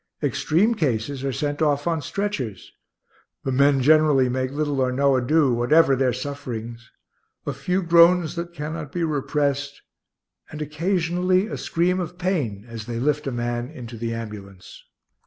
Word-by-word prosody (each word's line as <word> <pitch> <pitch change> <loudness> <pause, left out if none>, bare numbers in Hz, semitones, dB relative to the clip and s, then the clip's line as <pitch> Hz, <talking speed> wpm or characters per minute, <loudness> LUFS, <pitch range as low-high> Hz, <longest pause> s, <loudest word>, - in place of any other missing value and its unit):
Extreme 200 +9 +2
cases 135 - -1
are 135 - -1
sent 145 +3 -3
off 145 -2 +1
on 165 -2 0
stretchers. 145 - -4 0.7
The 135 - -1
men 140 0 +3
generally 150 -3 +4
make 130 +1 -1
little 145 -1 -1
or 130 -1 +1
no 140 +1 +2
ado, 135 +2 +3
whatever 135 +4 +4
their 130 -1 +2
sufferings 120 -3 -6 0.6
a - - -2
few 185 +1 -1
groans 170 0 +5
that 170 0 -5
cannot 155 -2 -6
be 175 +1 -2
repressed, 145 -2 -1 0.7
and 150 - -8
occasionally 180 +4 0
a 225 - -5
scream 180 +2 0
of 175 0 -5
pain 140 - -2
as 115 -2 -8
they 115 -1 -3
lift 150 +3 0
a - - -1
man 120 0 -3
into 120 -2 -9
the 115 +1 -3
ambulance. 105 -5 -8
145 Hz, 155 wpm, -23 LUFS, 125-165 Hz, 0.7 s, groans